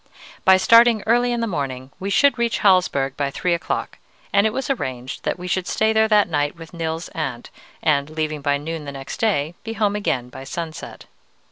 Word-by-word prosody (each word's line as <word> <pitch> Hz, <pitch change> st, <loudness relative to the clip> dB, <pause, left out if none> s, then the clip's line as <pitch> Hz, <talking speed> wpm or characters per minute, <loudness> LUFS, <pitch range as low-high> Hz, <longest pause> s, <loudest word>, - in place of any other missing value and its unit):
By 190 Hz, 0 st, +7 dB
starting 230 Hz, +2 st, +5 dB
early 245 Hz, +2 st, +3 dB
in 240 Hz, -1 st, -1 dB
the -, -, +1 dB
morning 135 Hz, -, -4 dB
we 195 Hz, -, -3 dB
should 280 Hz, +5 st, +3 dB
reach 235 Hz, -1 st, +1 dB
Hallsberg 175 Hz, -9 st, +3 dB
by 140 Hz, -1 st, -1 dB
three 175 Hz, +5 st, -1 dB
o'clock, 170 Hz, -, -3 dB, 0.3 s
and 200 Hz, +2 st, +5 dB
it -, -, +1 dB
was 265 Hz, +4 st, -3 dB
arranged 130 Hz, -, -4 dB
that -, -, -1 dB
we 180 Hz, -, -8 dB
should 185 Hz, 0 st, -1 dB
stay 220 Hz, 0 st, +1 dB
there 220 Hz, 0 st, +4 dB
that 210 Hz, -2 st, +4 dB
night 145 Hz, -2 st, -1 dB
with 165 Hz, 0 st, -12 dB
Nils's 165 Hz, 0 st, -4 dB
aunt, 140 Hz, -9 st, -5 dB, 0.3 s
and, 145 Hz, -2 st, +2 dB
leaving 155 Hz, -1 st, -3 dB
by 145 Hz, 0 st, +1 dB
noon 155 Hz, +1 st, -5 dB
the 140 Hz, -, -5 dB
next 135 Hz, -1 st, -7 dB
day, 170 Hz, -8 st, +1 dB
be 225 Hz, -, -5 dB
home 210 Hz, -2 st, 0 dB
again 130 Hz, -12 st, -1 dB
by 130 Hz, -, -9 dB
sunset. 160 Hz, +3 st, -7 dB
170 Hz, 205 wpm, -21 LUFS, 145-215 Hz, 0.3 s, By